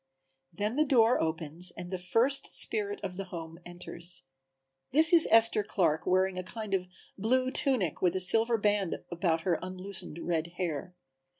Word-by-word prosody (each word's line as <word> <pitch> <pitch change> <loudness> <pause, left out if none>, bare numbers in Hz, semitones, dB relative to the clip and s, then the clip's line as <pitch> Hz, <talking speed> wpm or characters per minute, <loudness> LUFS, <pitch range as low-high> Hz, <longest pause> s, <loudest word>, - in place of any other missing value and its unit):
Then 210 - -3
the 305 - +4
door 245 -4 +3
opens 160 +2 -1
and 175 +1 -8
the 185 - -3
first 230 +10 0
spirit 410 -1 -2
of 185 -2 -5
the 195 - -5
home 165 -2 -9
enters. 175 -2 -8 0.7
This 320 +4 +6
is 335 -2 +7
Esther 225 -1 +5
Clark 165 -6 -1
wearing 185 0 +1
a - - -5
kind 215 +1 -7
of 185 -1 -1 0.3
blue 255 +5 +1
tunic 260 - +1
with 180 -1 +1
a - - 0
silver 225 +5 +4
band 205 -3 0 0.2
about 170 -2 0
her 170 -1 0
unloosened 185 -2 -5
red 170 0 -3
hair. 175 0 -4
185 Hz, 165 wpm, -29 LUFS, 175-225 Hz, 0.7 s, is